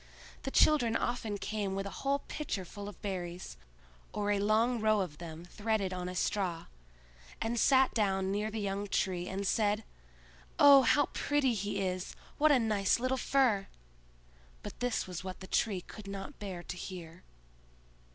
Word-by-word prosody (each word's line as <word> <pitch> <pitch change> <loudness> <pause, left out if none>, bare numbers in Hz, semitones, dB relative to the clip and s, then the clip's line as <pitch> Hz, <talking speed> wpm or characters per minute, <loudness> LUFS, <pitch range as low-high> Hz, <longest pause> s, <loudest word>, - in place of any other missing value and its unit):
The - - -3
children 265 -5 +4
often 230 -4 -1
came 200 -2 -2
with 195 0 -2
a 200 - -5
whole 280 +1 0
pitcher 220 -11 -3
full 205 +3 -7
of 205 - -13
berries, 180 - -4 0.6
or 205 0 0
a 205 - +2
long 225 +4 +2
row 215 -1 +3
of 155 -6 -5
them 165 0 -8
threaded 205 0 -1
on 180 0 -4
a 180 - -6
straw, 180 -3 -1 0.7
and 230 +1 -1
sat 265 +1 +5
down 195 -3 +1
near 210 +2 -1
the 220 +1 -4
young 200 0 -2
Tree 180 -2 -1
and 195 +1 -3
said, 210 +1 +1 0.7
"Oh, 280 -1 +9
how 275 +4 +4
pretty 285 -4 +1
he 205 -1 -2
is! 185 -1 -3 0.2
what 305 +1 +6
a 285 - +6
nice 215 -3 +2
little 255 +2 +1
fir!" 250 -7 +2 1.0
But - - -8
this 245 -1 0
was 180 -1 -6
what 185 -1 -6
the 190 - -8
Tree 195 -1 0
could 210 +3 -11
not 195 +7 -7
bear 185 -4 -6
to 180 - -6
hear. 175 -2 -8
205 Hz, 170 wpm, -32 LUFS, 185-230 Hz, 1.0 s, Oh